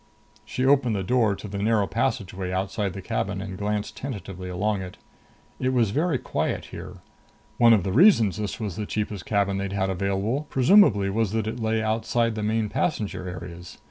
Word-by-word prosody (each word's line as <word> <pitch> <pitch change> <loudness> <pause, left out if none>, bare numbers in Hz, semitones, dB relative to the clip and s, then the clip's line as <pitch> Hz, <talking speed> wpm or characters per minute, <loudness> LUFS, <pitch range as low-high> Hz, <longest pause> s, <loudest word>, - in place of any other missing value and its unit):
She 130 +4 -2
opened 135 -5 +3
the 95 - -2
door 110 0 +2
to 105 - -8
the 100 0 -5
narrow 105 0 +2
passageway 95 -5 -2
outside 95 +1 -2
the 95 -1 -7
cabin 100 -2 -2
and 95 0 -6
glanced 105 +1 -2
tentatively 95 -8 -6
along 100 +2 -1
it. 90 -1 -8 0.6
It 130 0 0
was 115 -5 +2
very 155 +3 +1
quiet - - -2
here. - - -9 0.6
One 120 -1 +7
of 105 -5 +5
the 95 - -2
reasons 115 - +5
this 105 +2 -4
was 105 -6 -4
the 105 -1 -3
cheapest 105 -3 -3
cabin 100 -2 +1
they'd 100 0 -3
had 95 -1 0
available 100 +9 -1
presumably 125 - +5
was 110 0 0
that 110 -1 0
it 115 +3 -4
lay 110 0 0
outside 115 +1 0
the 110 - -4
main 110 +1 0
passenger 105 - -2
areas. 90 0 -9
105 Hz, 185 wpm, -25 LUFS, 95-115 Hz, 0.6 s, One